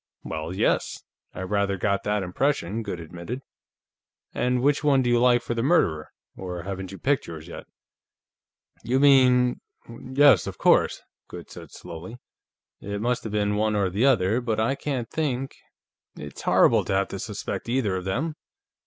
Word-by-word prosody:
"Well, 80 +1 -5
yes; 95 - 0 0.3
I - - -8
rather 100 0 0
got 100 +1 0
that 105 -1 0
impression," 110 +1 -1
Goode 100 -5 -5
admitted. 85 +10 -7 0.9
"And 125 0 0
which 145 +2 +2
one 140 -3 +3
do 120 - +1
you 120 - +4
like 120 -1 +4
for 120 - -3
the 115 - -1
murderer? 115 - +1 0.3
Or 90 -2 -6
haven't 95 -1 -6
you 95 - -8
picked 140 +5 0
yours, 80 -1 -8
yet?" 85 - -9 1.2
"You 130 +3 +1
mean.... 130 -3 +4 0.3
Yes, 130 - +3
of - - -6
course," - - +3 0.2
Goode - - -10
said - - -10
slowly. 85 +8 -9 0.6
"It 100 0 -5
must 120 +3 0
have 110 - -4
been 105 0 0
one 110 0 +1
or 100 -3 +1
the 110 +9 +2
other. 110 -2 +2
But 115 -3 -1
I 110 +4 +1
can't 135 -4 -3
think.... 135 -3 -2 0.6
It's 70 -2 -9
horrible - - +4
to - - -2
have 95 0 +1
to 100 - -6
suspect 105 +3 -5
either 120 -6 0
of 90 0 -4
them." 135 +12 -2
110 Hz, 170 wpm, -25 LUFS, 95-125 Hz, 1.2 s, you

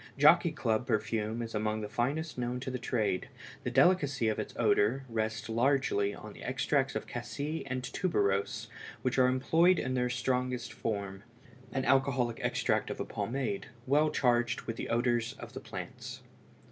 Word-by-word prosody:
Jockey - - +6
Club 110 +2 0
perfume 110 0 0
is 115 - -6
among 110 0 -1
the 105 - -3
finest 140 +9 -1
known 125 0 -2
to 130 - -4
the 125 - -3
trade; 110 -6 0 0.4
the - - -1
delicacy 135 -3 +3
of 110 - -1
its - - -3
odor 130 +6 +3
rests 110 -1 -2
largely 115 -4 +2
on - - -10
the - - -13
extracts - - 0
of - - -2
cassie 150 +3 -4
and 130 -1 -3
tuberose 105 - 0 0.4
which 130 0 +1
are 125 - +6
employed 165 +8 +4
in 130 - -1
their 125 -1 +1
strongest 125 0 -1
form—an 120 +6 -5
alcoholic 130 -3 +2
extract - - +1
of - - -5
a - - -2
pomade 120 -5 -2 0.2
well 150 +3 +4
charged 120 -4 +2
with 115 - -4
the - - -5
odors 120 0 +1
of 120 -2 -10
the 130 - -5
plants. 95 -8 -7
120 Hz, 160 wpm, -31 LUFS, 110-130 Hz, 0.4 s, Jockey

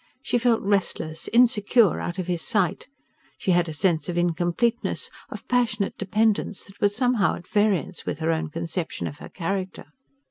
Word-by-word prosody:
She 245 - +1
felt 235 -2 +2
restless, 180 -5 -1
insecure 230 -4 +4
out 175 - -4
of 185 - -2
his 175 -2 -2
sight: 195 0 0 0.5
she 190 - 0
had 175 -1 +3
a - - -3
sense 165 +2 +1
of 175 - -2
incompleteness, 175 +7 0 0.2
of - - -9
passionate 225 -5 +1
dependence, 210 +1 0
that 195 - -15
was 205 0 +2
somehow 245 -4 +2
at 175 - -11
variance 205 -3 +1
with - - -3
her 160 0 0
own 160 0 -1
conception 165 +2 -4
of 145 - -6
her - - -9
character. 190 +1 -4
190 Hz, 170 wpm, -25 LUFS, 170-215 Hz, 0.5 s, insecure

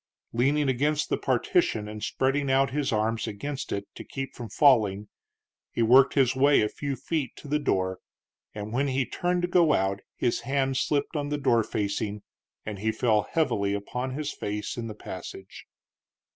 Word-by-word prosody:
Leaning 140 +5 +2
against 145 +4 +1
the - - +2
partition, 125 - +1
and 105 0 -7
spreading 135 +4 0
out 135 0 +3
his 145 0 -1
arms 110 +1 0
against 135 +7 -5
it 100 0 -2
to - - -9
keep 135 -1 -6
from 120 -3 -8
falling, 105 -8 +4 0.6
he 115 - 0
worked 130 +4 +6
his 130 -3 +3
way 140 +2 +5
a - - +2
few 140 +5 -4
feet 145 +1 -3
to - - -11
the 150 +1 +1
door, 95 -9 0 0.6
and 105 +1 -5
when 135 +3 +1
he 130 -1 0
turned 175 +5 -1
to - - +2
go 175 -4 +4
out 95 -1 +1 0.2
his 120 - 0
hand 135 +1 0
slipped 145 +3 0
on 145 -1 -1
the 150 - -1
door 120 -5 +3
facing 105 0 -2 0.4
and 105 -2 -5
he 110 +2 0
fell 110 -2 +1
heavily 100 -11 +1
upon 125 +6 -4
his 150 0 -3
face 105 +1 -4
in 115 -1 -4
the 110 - -7
passage. 95 -1 -9
130 Hz, 180 wpm, -27 LUFS, 105-145 Hz, 0.6 s, worked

